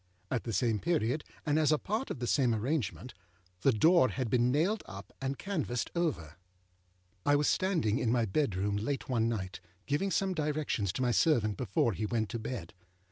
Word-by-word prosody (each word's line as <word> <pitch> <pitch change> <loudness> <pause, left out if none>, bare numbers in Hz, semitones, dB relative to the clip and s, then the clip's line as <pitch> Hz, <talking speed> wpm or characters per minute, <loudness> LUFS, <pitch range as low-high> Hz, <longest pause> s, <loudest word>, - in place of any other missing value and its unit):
At 125 - -1
the 115 - -2
same 115 -1 +1
period, 150 -3 0 0.2
and 150 0 +2
as 155 -1 +3
a 155 - +4
part 220 - -3
of - - -4
the 125 - -3
same 120 -2 +2
arrangement, 125 0 -2 0.5
âthe 130 -5 +4
door 170 - +6
had 130 -4 -3
been 125 0 +3
nailed 180 - +1
up 100 0 -10
and 135 0 -2
canvased 155 - -2
over. 85 - -2 0.9
I 145 - +4
was 145 0 +2
standing 160 - +1
in 115 - +1
my 120 -2 +2
bedroom 100 -3 0
late 135 +7 -3
one 115 -2 +2
night, 95 -5 -4 0.3
giving 150 +8 0
some 190 0 +1
directions 150 - -1
to 130 - -1
my 125 - +2
servant 115 -7 +3
before 100 +4 0
he 105 +2 -2
went 110 -1 -1
to 115 - -4
bed. 110 -6 -6
125 Hz, 190 wpm, -31 LUFS, 110-155 Hz, 0.9 s, door